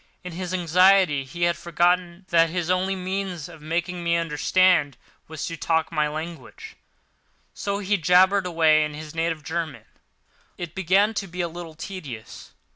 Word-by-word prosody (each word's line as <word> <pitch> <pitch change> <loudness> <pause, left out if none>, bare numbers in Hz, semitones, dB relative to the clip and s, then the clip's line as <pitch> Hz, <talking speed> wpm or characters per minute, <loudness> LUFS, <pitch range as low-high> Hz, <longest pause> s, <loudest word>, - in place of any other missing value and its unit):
In 180 - -7
his 180 +1 -5
anxiety 180 -3 +4
he 170 +6 -5
had 170 0 +3
forgotten 175 +2 0
that 165 -1 +4
his 175 0 -2
only 185 +1 +1
means 185 -3 -4
of 165 -3 -13
making 175 +3 -3
me 170 0 +2
understand 165 -1 +2 0.3
was 160 0 -5
to 165 - -4
talk 160 +1 0
my 150 -2 +1
language, 160 +2 -8 0.8
so 200 0 -3
he 205 0 0
jabbered 185 +3 +4
away 160 -3 +4
in 150 -1 -4
his 155 0 -9
native 165 -1 -2
German. 160 0 -4 0.7
It 175 -2 -6
began 195 +4 +2
to 205 -2 -3
be 180 0 -4
a 170 - -1
little 170 -1 -9
tedious. 155 - -8
170 Hz, 160 wpm, -24 LUFS, 160-185 Hz, 0.8 s, anxiety